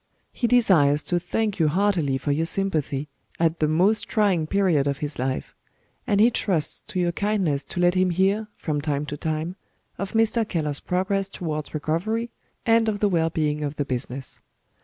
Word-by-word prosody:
He 240 - -1
desires 170 -12 +4
to 175 - 0
thank 205 +3 -2
you 160 - +4
heartily 170 -5 +1
for 145 - -2
your 160 +3 +1
sympathy, 155 -7 0 0.3
at 165 0 +1
the 155 - +2
most 195 +7 +2
trying 195 -7 +2
period 175 -7 +2
of 140 -1 0
his 145 -2 -5
life; 130 +1 -2 0.5
and 205 - +2
he 230 +3 +6
trusts 175 -9 0
to 185 - -3
your 175 -1 +1
kindness 185 -7 0
to 175 - -6
let 175 0 +4
him 185 0 +2
hear, 195 +5 +1
from 150 -2 -2
time 145 -1 -1
to 150 - -5
time, 160 +3 -3 0.4
of 195 -1 -4
Mr. 225 +1 +3
Keller's 150 -8 -2
progress 195 +2 -1
towards 155 -5 -5
recovery, 215 +10 -1 0.3
and 225 -1 +4
of 210 - -1
the 205 - +2
well 165 -3 +2
being 150 -2 -1
of 145 0 -3
the 145 - -2
business. 130 0 -5
170 Hz, 180 wpm, -24 LUFS, 150-200 Hz, 0.5 s, he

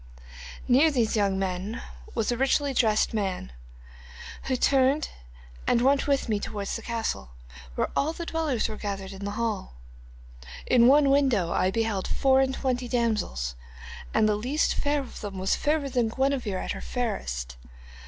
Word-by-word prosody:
'Near 270 +6 +5
these 240 -7 +1
young 200 -2 +2
men 190 +4 -3 0.4
was 225 0 0
a - - +2
man - - -9
richly 275 +1 +2
dressed, 220 -4 +2
who 60 - -6
turned 270 +3 +3 0.6
and 235 - +3
went 275 +2 +3
with 280 -2 +1
me 215 -2 0
towards 205 -1 -4
the 230 - -4
castle, 225 - -3 0.4
where - - 0
all 295 +3 +1
the 340 +1 -6
dwellers 315 -8 0
were 215 -1 -6
gathered 195 -2 -5
in 195 +1 -7
the - - -2
hall. 220 - -2 0.9
In 240 -1 +5
one 280 +1 +6
window 260 -11 +2
I 185 - +2
beheld 220 -2 -1
four 265 -1 +3
and 265 0 0
twenty 250 -2 -1
damsels, 215 - -1 0.6
and 220 -1 +3
the 210 - +3
least 255 +9 0
fair 290 0 0
of 265 - -10
them 200 -2 -6
was 190 +1 +1
fairer 295 -1 0
than 245 -4 +1
Guenevere 260 -5 0
at - - -3
her - - -5
fairest. - - -3
225 Hz, 165 wpm, -27 LUFS, 190-265 Hz, 0.9 s, one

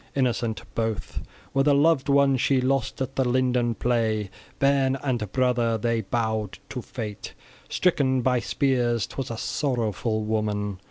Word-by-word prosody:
{16f} - - -28
Innocent 120 -3 0
both 110 -2 -3 0.3
were 135 - +3
the 140 0 +4
loved 145 -1 +3
ones 140 -2 +4
she 135 -2 +3
lost 130 0 0
at 130 +1 -7
the 135 - +2
linden 125 -2 +1
play, 110 -5 0 0.3
bairn 135 -1 +3
and 120 -8 -1
brother, 120 -2 +1
they 115 +1 0
bowed 110 -1 -2
to - - -4
fate, 105 -2 -7 0.3
stricken 135 -8 +2
by 125 -1 +2
spears; 120 -4 +1
'twas 135 - -5
a 115 - -4
sorrowful 115 -5 -1
woman! 105 -2 -1
120 Hz, 150 wpm, -25 LUFS, 110-135 Hz, 0.3 s, the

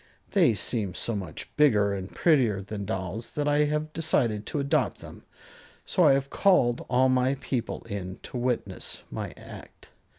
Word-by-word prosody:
They 115 - +4
seem 100 -1 -2
so 115 - -2
much 95 -5 -6
bigger 105 -9 +4
and 95 -1 -5
prettier 120 - +2
than 100 0 -5
dolls 95 +4 -4
that 150 -1 -1
I 145 +1 +3
have 150 +1 -2
decided 120 -10 0
to - - -3
adopt 140 0 +1
them, - - -12 0.6
so - - +3
I - - +7
have 135 0 -1
called 130 -12 +3
all 130 +1 +4
my 130 +1 +2
people 130 -3 -3
in 95 -4 -6
to - - -10
witness 125 -1 -3
my - - -4
act." - - -12
120 Hz, 165 wpm, -27 LUFS, 100-140 Hz, 0.6 s, I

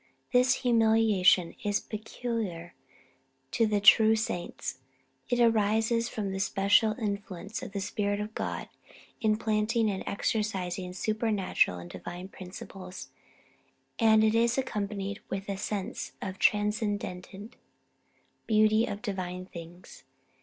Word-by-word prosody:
This 250 +2 +3
humiliation 220 -6 +4
is 205 0 +1
peculiar 215 -5 -5 0.8
to 230 -2 +2
the 210 -1 +1
true 220 +2 +7
saints. 195 - -4 0.5
It 245 0 +1
arises 225 +1 +3
from 205 -3 -3
the 190 - -3
special 200 +3 +3
influence 205 -2 -4
of - - -7
the 200 -1 -3
Spirit 205 +1 -1
of 210 +1 -5
God - - -3 0.5
implanting 215 0 +1
and 190 - -4
exercising 190 -4 -2
supernatural 210 - +1
and 85 0 -8
divine 175 - -8
principles; 185 0 -9 0.9
and 220 -2 +5
it 220 0 +3
is 235 +1 +3
accompanied 200 -5 -3
with 195 +1 -4
a 200 - -2
sense 195 0 -4
of 190 - -4
the - - -21
transcendent 205 -1 -1 0.9
beauty 215 +1 +4
of 205 +1 -5
divine 185 -4 -4
things. 175 0 -11
210 Hz, 120 wpm, -29 LUFS, 190-220 Hz, 0.9 s, true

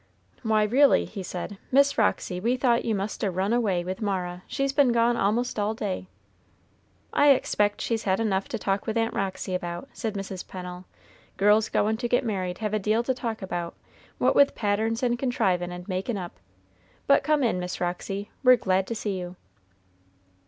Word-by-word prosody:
"Why, 220 -1 +2
reely," 265 +7 +4
he 200 - -7
said, 185 +2 -6
"Miss 280 +2 +4
Roxy, 195 -4 0
we 235 +6 +1
thought 245 -2 +2
you 225 -2 +1
must 200 +2 -4
a 200 - +2
run 190 +4 0
away 200 -7 +1
with 185 +4 -5
Mara; 180 -3 -2
she's 275 -1 -1
been 275 -3 +4
gone 235 0 +3
a'most 230 +2 0
all 210 +2 0
day." 190 -4 -4 1.1
"I 290 - +5
expect 210 -6 +2
she's 225 -2 -1
had 190 0 +1
enough 195 -4 0
to 230 - -3
talk 195 -1 -2
with 220 +1 -1
Aunt 225 0 0
Roxy 190 -1 -3
about," 175 +7 -4
said 220 -3 -4
Mrs. 195 -2 -5
Pennel. 180 0 -8 0.5
"Girls 210 +2 +4
goin' 220 +1 +1
to 240 +1 -2
get 245 0 +2
married 185 -5 -2
have 215 -1 -3
a 215 - +2
deal 215 +3 +1
to 260 - 0
talk 230 -4 -4
about, 175 -2 -4 0.4
what - - +2
with 280 0 +5
patterns 220 +3 0
and 240 -1 +1
contrivin' 195 -9 0
and 180 0 -8
makin' 195 +4 -2
up. 175 -2 -7 0.7
But 280 - +5
come 300 0 +2
in, 225 -6 +1
Miss 180 0 -4
Roxy; 195 +3 -3
we're 255 -1 +8
glad 190 -4 0
to 230 - -3
see 205 -4 -3
you." 180 0 -7
210 Hz, 190 wpm, -26 LUFS, 185-235 Hz, 1.1 s, we're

